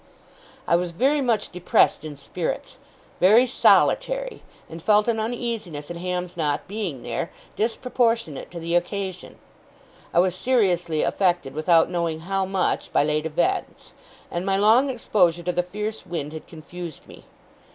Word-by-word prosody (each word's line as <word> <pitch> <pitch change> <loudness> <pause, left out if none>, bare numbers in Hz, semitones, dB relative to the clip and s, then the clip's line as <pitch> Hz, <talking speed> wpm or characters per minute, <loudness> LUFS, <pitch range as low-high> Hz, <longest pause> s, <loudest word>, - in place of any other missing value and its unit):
I 170 - +4
was 175 +1 0
very 275 - +2
much 230 -5 0
depressed 180 -4 +2
in 150 -2 -7
spirits; 160 +4 -5 0.4
very 215 +7 +6
solitary; - - +2 0.3
and 165 +1 -9
felt 210 +3 +3
an 230 -2 +1
uneasiness 220 -10 -4
in 170 - -6
Ham's 180 0 -3
not 150 -3 -1
being 190 - -4
there, - - -3 0.3
disproportionate 230 - -1
to 175 - -8
the 170 +1 -3
occasion. 185 +1 -2 0.7
I - - -3
was 180 0 +3
seriously 180 -8 +1
affected, 175 -7 0
without 165 +2 +3
knowing 170 -2 -2
how 195 +2 -1
much, 190 -1 -1
by - - +3
late 150 +1 0
events; 155 - -2 0.4
and 170 - -2
my 195 0 +1
long 225 +7 +5
exposure 180 -9 +1
to 180 - 0
the 180 - +1
fierce 210 +4 -5
wind 165 -4 -5
had 160 - -8
confused 170 0 -9
me. - - -14
180 Hz, 150 wpm, -24 LUFS, 165-215 Hz, 0.7 s, very